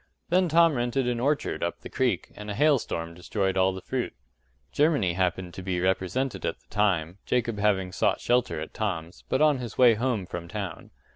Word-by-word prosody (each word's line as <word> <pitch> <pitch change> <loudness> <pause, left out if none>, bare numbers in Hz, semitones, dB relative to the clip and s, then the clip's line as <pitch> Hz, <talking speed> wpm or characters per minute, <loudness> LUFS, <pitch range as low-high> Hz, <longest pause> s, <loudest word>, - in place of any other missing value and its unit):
Then 180 0 +3
Tom 165 0 +5
rented 120 +1 0
an 120 -1 0
orchard 140 +4 0
up - - -2
the - - -7
creek, - - -1
and 105 0 -8
a 105 - -3
hailstorm 110 - +1
destroyed 95 +2 -2
all 95 0 +3
the 95 -1 -8
fruit. - - -3 0.6
Germany 145 - +2
happened 90 0 -1
to - - -7
be 90 -1 -2
represented 95 +4 -1
at - - -2
the - - -34
time, 95 -4 0
Jacob 115 -4 0
having 95 -3 +1
sought - - +1
shelter 120 -10 +1
at 80 - -7
Tom's 90 -6 -4
but 130 +3 +2
on 150 -3 +4
his 120 -3 -7
way 125 -2 +7
home 115 -3 -1
from 85 -1 -6
town. 100 -1 -6
105 Hz, 195 wpm, -27 LUFS, 90-125 Hz, 0.6 s, way